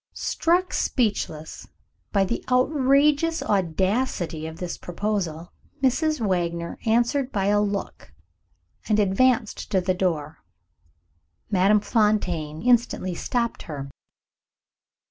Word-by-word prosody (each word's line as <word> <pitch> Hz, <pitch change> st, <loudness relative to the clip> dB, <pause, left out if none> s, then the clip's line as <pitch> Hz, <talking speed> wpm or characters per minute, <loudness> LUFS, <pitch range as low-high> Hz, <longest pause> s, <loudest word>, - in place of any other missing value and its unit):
Struck 355 Hz, +2 st, 0 dB
speechless 200 Hz, -, -1 dB, 0.4 s
by 200 Hz, -2 st, +3 dB
the 235 Hz, -, -3 dB
outrageous 285 Hz, +4 st, +3 dB
audacity 185 Hz, -2 st, 0 dB
of 160 Hz, 0 st, -8 dB
this 180 Hz, -2 st, -4 dB
proposal, 175 Hz, -3 st, -3 dB, 0.3 s
Mrs. 305 Hz, +4 st, +2 dB
Wagner 170 Hz, -5 st, -2 dB
answered 240 Hz, +4 st, +2 dB
by 195 Hz, -2 st, -1 dB
a 205 Hz, +1 st, +3 dB
look, 200 Hz, -, -4 dB, 0.8 s
and 215 Hz, -, +3 dB
advanced 215 Hz, +3 st, +1 dB
to 195 Hz, -3 st, +2 dB
the 185 Hz, +1 st, 0 dB
door. 165 Hz, -5 st, -2 dB, 1.1 s
Madame 200 Hz, +2 st, +4 dB
Fontaine 180 Hz, -9 st, 0 dB
instantly 235 Hz, -6 st, +2 dB
stopped 235 Hz, +6 st, -2 dB
her. 140 Hz, -2 st, -6 dB
205 Hz, 100 wpm, -24 LUFS, 175-245 Hz, 1.1 s, Madame